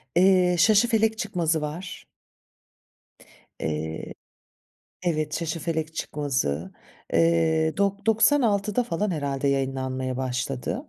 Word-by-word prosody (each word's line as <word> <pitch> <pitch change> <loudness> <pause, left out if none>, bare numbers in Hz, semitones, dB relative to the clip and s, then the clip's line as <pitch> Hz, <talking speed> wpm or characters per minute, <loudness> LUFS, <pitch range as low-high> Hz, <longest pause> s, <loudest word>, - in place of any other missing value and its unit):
Eee, 180 -1 +4
Şaşıfelek 220 +1 +4
Çıkmazı 170 -7 0
var. 170 +5 -6 1.5
Eee 80 0 -4 0.9
Evet, 155 -2 0
Şaşıfelek 160 -1 -3
Çıkmazı. 95 - -2 0.4
Eee, 160 -1 +2
dok 200 +1 0
doksan 225 +6 +4
altıda 210 +2 +1
falan 210 -1 -1
herhâlde 140 -4 -1
yayınlanmaya 130 -1 -1
başladı. 130 - -3
160 Hz, 90 wpm, -25 LUFS, 135-200 Hz, 1.5 s, Eee